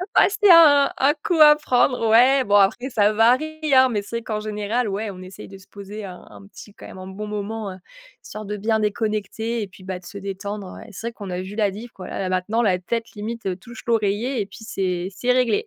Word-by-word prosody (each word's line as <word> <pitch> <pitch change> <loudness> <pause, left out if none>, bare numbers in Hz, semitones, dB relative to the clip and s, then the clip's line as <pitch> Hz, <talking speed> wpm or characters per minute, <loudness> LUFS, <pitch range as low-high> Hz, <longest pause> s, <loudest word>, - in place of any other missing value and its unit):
bah, - - +6
c'est 410 0 +2
un 290 -4 +7
un 280 +2 +3
coup 340 -3 0
à 300 0 +9
prendre. 250 -4 +1
Ouais, 255 +4 +5
bon, 205 0 +2
après 205 +6 +3
ça 210 -3 +2
varie, 260 +8 +2
hein. 260 0 +6
Mais 210 -3 -1
c'est 230 +3 -5
vrai 230 - -7
qu'en 215 -1 -3
général, 215 +2 -2
ouais, 205 +2 -3
on 185 -1 -11
essaye 185 +1 -11
de 195 - -11
se 185 - -19
poser 205 +1 -9
un 180 -1 -10
un 100 -1 -14
petit 205 - -14
quand - - -12
même - - -11
un 185 - -9
bon 210 +2 -7
moment, 210 -1 -5 0.5
histoire 215 0 -8
de 210 +1 -4
bien 220 +2 0
déconnecter 215 +2 -2
et - - -6
puis, 185 0 -17
bah, 185 -1 -5
de 180 - -19
se 200 - -9
détendre. 200 0 -6
Ouais, - - -11
c'est 220 +4 -6
vrai 235 - -5
qu'on 200 -4 -9
a 180 - -3
vu 195 +2 -8
la 205 -3 +1
différence 225 +4 -9
quoi 185 - -10
là - - -5
là 185 -1 -2
maintenant, 185 +6 0
la 185 -4 +2
tête, 230 +5 -4
limite, 210 -3 -5
touche 235 +3 -12
l'oreiller, 225 +2 0
et - - -2
puis, 220 - -13
c'est 185 -2 -2
c'est 250 0 0
réglé. 255 - +1
210 Hz, 245 wpm, -22 LUFS, 195-235 Hz, 0.5 s, à